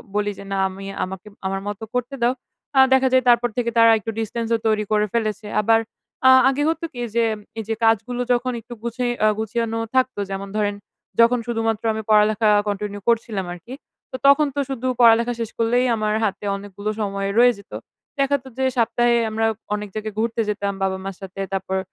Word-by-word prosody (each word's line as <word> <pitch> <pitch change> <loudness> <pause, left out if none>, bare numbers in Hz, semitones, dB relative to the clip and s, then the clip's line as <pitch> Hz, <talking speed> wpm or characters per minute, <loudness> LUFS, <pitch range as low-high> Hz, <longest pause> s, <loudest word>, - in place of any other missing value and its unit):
বলি 205 0 +1
যে, - - -9
"না 195 - -1
আমি 195 +1 -9 0.2
আমাকে, 190 +2 -7 0.2
আমার 195 0 -2
মতো 205 +2 -5
করতে 250 +2 -2
দাও।" 240 +2 +3 0.4
আ - - +7
দেখা 265 0 +4
যায় 260 -1 +5
তারপর 240 0 +4
থেকে 235 -1 +1
তারা 230 0 +7
একটু 225 - -7
ডিসট্যান্স 225 +1 -3
ও - - +1
তৈরি 215 -1 +2
করে 210 0 +3
ফেলেছে। 215 -2 -2
আবার 225 +2 +4 0.5
আ - - +9 0.2
আগে 280 +2 0
হতো 325 +1 -2
কি? 245 - -8 0.2
যে, 235 - +3 0.4
এই - - -3
যে - - +1
কাজগুলো 225 +3 +2
যখন 250 +1 0
একটু 240 +2 -10
গুছায় 240 +1 -1
আ - - +6
গুছানো 225 +1 -2 0.2
থাকতো, 255 -4 +1
যেমন 195 +1 -4
ধরেন 205 -1 0 0.4
যখন 235 +1 +5
শুধুমাত্র 225 -1 -1
আমি 220 - -3
পড়ালেখা 215 +1 +4 0.2
কন্টিনিউ 205 0 -3
করছিলাম 220 -4 0
আরকি। 180 +9 -11 0.4
তো - - -5
তখন 290 +1 +6
তো - - -1
শুধু 255 -1 -3
পড়ালেখা 235 +1 +5
শেষ 225 -2 -3
করলেই 240 +2 +2
আমার 215 -1 -1
হাতে 205 0 -2
অনেকগুলো 200 +1 -6
সময় 195 -1 -2
রয়ে 245 0 +6
যেত। - - -18 0.5
দেখাত 275 -1 +1
যে 265 - +1
সপ্তাহে 240 +1 +2
আমরা 225 +1 0 0.3
অনেক 210 0 -5
জায়গায় 215 -1 -4
ঘুরতে 230 0 0
যেতাম, 200 -1 -2
বাবা-মার 190 0 -3
সাথে। 195 +1 -7
তারপর 190 0 -2
225 Hz, 190 wpm, -22 LUFS, 205-240 Hz, 0.5 s, আ